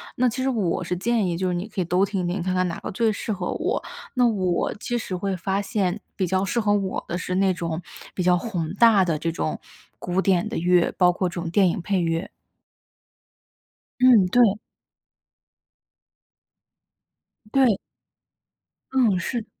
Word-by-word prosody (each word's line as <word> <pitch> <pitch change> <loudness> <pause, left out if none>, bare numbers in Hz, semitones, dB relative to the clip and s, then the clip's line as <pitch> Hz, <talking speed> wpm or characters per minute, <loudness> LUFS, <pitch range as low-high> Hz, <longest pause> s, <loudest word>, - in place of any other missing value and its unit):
那 250 0 +2
其 260 +3 -4
实 265 - 0
我 200 -9 0
是 180 +1 -2
建 220 +1 0
议 170 - -2
就 185 +1 -1
是 - - -1
你 175 +4 -3
可 200 -3 -3
以 - - -1
都 180 +3 +2
听 195 -2 -2
听， 180 +1 -2
看 185 +1 -1
看 185 0 +2
哪 170 - -5
个 - - -6
最 225 +3 +1
适 215 +1 -3
合 195 - -3
我。 - - -2 0.3
那 250 -2 +3
我 185 -5 0
其 240 +3 -3
实 220 -5 -5
会 190 +1 -2
发 195 +2 -1
现， 200 -2 -1 0.2
比 190 - 0
较 190 +2 0
适 235 +5 -1
合 210 -1 +1
我 195 -2 -1
的 175 - -3
是 185 0 -3
那 190 -1 +3
种 170 -1 -4 0.3
比 180 - -2
较 180 0 +4
宏 175 -5 -3
大 215 -3 +6
的 165 -4 -1
这 165 - -1
种 155 - -3 0.4
古 180 +1 -1
典 190 +1 +2
的 - - -5
乐， 175 0 +2
包 180 -1 +5
括 180 +1 -1
这 - - -12
种 170 - -4
电 190 +1 +4
影 170 - -2
配 195 0 0
乐。 165 +1 -1 1.7
嗯， 245 -6 +7
对。 225 0 +4 3.0
对。 255 -7 +4 1.2
嗯， 235 -8 +3
是。 230 +5 -3
190 Hz, 195 characters per minute, -24 LUFS, 180-215 Hz, 3.0 s, 嗯